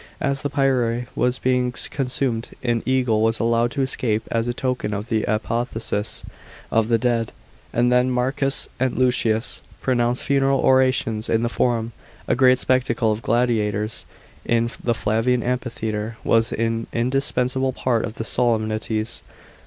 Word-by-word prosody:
As 140 -1 -1
the 145 - -2
pyre 125 -4 +1
was 125 +1 +1
being 125 -1 +1 0.2
consumed, 125 -4 -1
an 120 -2 +1
ea^le 125 -4 +2
was 115 0 +1
allowed 115 +1 +2
to 140 - 0
escape, 110 -4 0
as 115 0 0
a - - +1
token 125 -4 -2
of 105 +3 -5
the 110 -2 +1
apotheosis 110 0 -1 0.5
of 115 -1 +2
the 115 -1 +3
dead; 115 -1 0 0.4
and 120 +1 +2
then 125 +1 +3
Marcus 135 +2 0
and 130 -1 0
Lucius 120 -3 +1 0.2
pronounced 120 -1 0
funeral 135 0 +2
orations 130 -4 +2
in 115 +1 +2
the 120 - +1
Forum. 115 -1 0 0.4
A - - +2
great 130 0 +5
spectacle 125 -3 +1
of 105 +1 -2
gladiators, 110 -2 0 0.4
in 115 0 +1
the 120 -1 +1
Flavian 115 +3 +1
amphitheatre, 115 -3 -3
was 115 +1 +3
an 115 0 -1
indispensable 130 +1 0
part 120 -2 0
of 110 - -5
the - - -4
solemnities. 110 -1 -1
120 Hz, 145 wpm, -22 LUFS, 115-130 Hz, 0.5 s, great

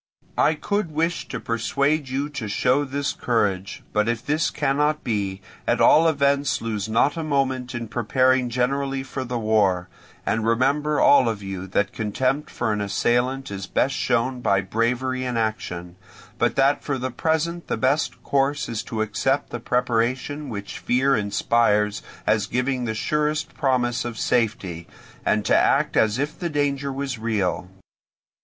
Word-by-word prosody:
I 155 - +4
could 200 +4 -1
wish 165 +3 -1
to - - -5
persuade 140 +5 0
you 135 +3 -1
to 140 -7 -5
show 125 +7 +2
this 140 +1 -2
courage; 100 -5 -1
but 105 +2 +2
if 120 0 -2
this 155 +2 +1
cannot 150 +1 0
be, 100 -4 -2 0.3
at - - +2
all 165 +2 +6
events 140 -2 +2
lose 110 -2 -3
not 115 +7 +2
a 165 - -2
moment 130 -4 -1
in 120 -1 -4
preparing 125 +3 +2
generally 135 +2 -1
for 135 0 -5
the 125 -1 -3
war; 100 -5 +1 0.4
and 110 - 0
remember 140 +6 +2
all 130 -4 +6
of 105 -3 -4
you 95 -1 -5
that 100 +1 0
contempt 130 +7 -1
for 110 -3 -1
an 105 - -2
assailant 120 +5 0
is 95 -2 -5
best 140 - +1
shown 125 0 0
by 100 -4 +3
bravery 125 +6 -1
in 125 -2 -2
action, 90 -6 -3 0.4
but - - +2
that 135 +1 +3
for 140 -2 -1
the 130 0 -3
present 160 +5 -1
the - - -1
best 135 +4 0
course 140 +1 +1
is 115 -2 -3
to 110 -1 -2
accept 135 +6 -1
the 120 - -4
preparations 125 +4 -1
which 100 -3 -6
fear 135 +3 +2
inspires 105 0 +1 0.2
as - - +2
giving 125 0 -1
the 110 -1 -2
surest 150 +5 -1
promise 125 -4 +1
of 120 -1 -5
safety, 100 -10 -1 0.4
and 105 -1 +1
to - - +3
act - - +3
as 110 +1 +3
if 145 +3 -3
the 175 - -2
danger 140 -2 -1
was 135 -3 -4
real. 100 -5 -1
125 Hz, 160 wpm, -23 LUFS, 110-140 Hz, 0.4 s, all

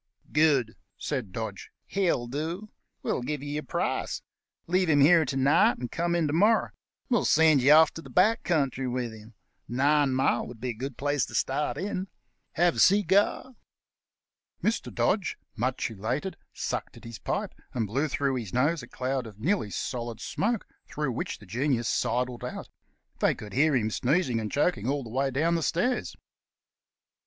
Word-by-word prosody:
"Good!" 145 -7 +3 0.2
said 130 -10 -3
Dodge; 110 -1 -5 0.2
"he'll 180 -11 0
do. 160 - -4 0.3
We'll - - -1
give 145 +2 -3
you 145 - -5
your 150 +1 -2
price. 135 - -2 0.4
Leave 180 0 +1
him 145 -2 +4
here 160 +2 +6
to 135 0 -3
night, 160 - +4
and 120 -2 -5
come 170 0 0
in 170 -2 +2
to 145 - -1
morrow. 210 +7 +3 0.4
We'll 240 -4 +2
send 155 -3 +5
you 140 +4 +7
off 160 +1 +6
to 165 - -7
the - - -12
back 210 +5 +3
country 135 -6 0
with 125 -1 -2
him. 110 +1 -14 0.3
Nine 140 +2 +2
mile 130 -2 +1
would 120 -1 -10
be 125 +2 -3
a - - -2
good 130 +3 -6
place 145 -2 0
to - - -8
start 145 +3 0
in. 190 0 -3 0.5
Have 175 0 +2
a - - -1
cigar?" 200 +6 +3 1.1
Mr. 225 - 0
Dodge, 195 -3 0 0.2
much 125 +1 -1
elated, 125 - -3 0.2
sucked - - -4
at - - -14
his 115 -3 -8
pipe, - - -3 0.2
and 115 -3 0
blew 135 +9 0
through 135 -2 0
his 110 -7 -5
nose 145 +5 +2
a - - -10
cloud 130 -1 -3
of 105 -3 -12
nearly 170 - 0
solid 115 +6 -4
smoke, 225 +1 -1 0.2
through 150 -3 -2
which 115 - -4
the 105 - -15
Genius 120 +3 0
sidled 125 +1 -1
out. - - -6 0.5
They - - +3
could 105 -1 -10
hear 150 +3 +3
him 110 -3 +1
sneezing 130 -1 +1
and 110 -1 -4
choking 135 - +1
all 140 0 -1
the 115 - -9
way 135 +3 +1
down 155 +6 +1
the 165 - +1
stairs. 245 +11 0
140 Hz, 180 wpm, -28 LUFS, 120-165 Hz, 1.1 s, you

